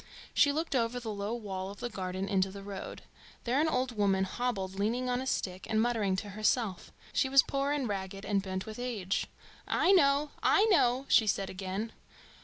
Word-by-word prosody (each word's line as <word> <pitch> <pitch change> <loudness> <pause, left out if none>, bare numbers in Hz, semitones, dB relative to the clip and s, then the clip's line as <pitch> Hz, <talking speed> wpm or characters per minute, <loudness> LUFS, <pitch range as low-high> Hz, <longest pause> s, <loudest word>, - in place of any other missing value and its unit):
She 285 - +5
looked 315 0 -2
over 240 0 +1
the 225 -3 -5
low 205 +3 -3
wall 190 -4 -5
of 200 - -10
the - - -2
garden 190 -3 -4
into 190 -1 +1
the 195 +1 -9
road. 195 -1 -7 0.4
There 255 +4 +2
an 320 - +2
old 255 -5 0
woman 195 -2 +2
hobbled, 195 -2 -3
leaning 235 +5 0
on 245 +1 0
a 265 - -5
stick, 185 -6 -2
and 220 - +2
muttering 220 -5 +1
to 205 +2 -4
herself. 215 -1 0 0.2
She 275 -2 +2
was 275 0 +7
poor 275 +1 -1
and 290 -4 0
ragged, 195 -1 -4
and 200 -2 +1
bent 190 -1 -4
with 220 +1 -8
age. 215 -7 -2 0.4
"I - - +3
know, 285 -5 +4
I 410 - +5
know!" 255 -6 +3
she 220 - +5
said 195 -1 0
again. 195 +4 -4
215 Hz, 200 wpm, -31 LUFS, 195-250 Hz, 0.4 s, was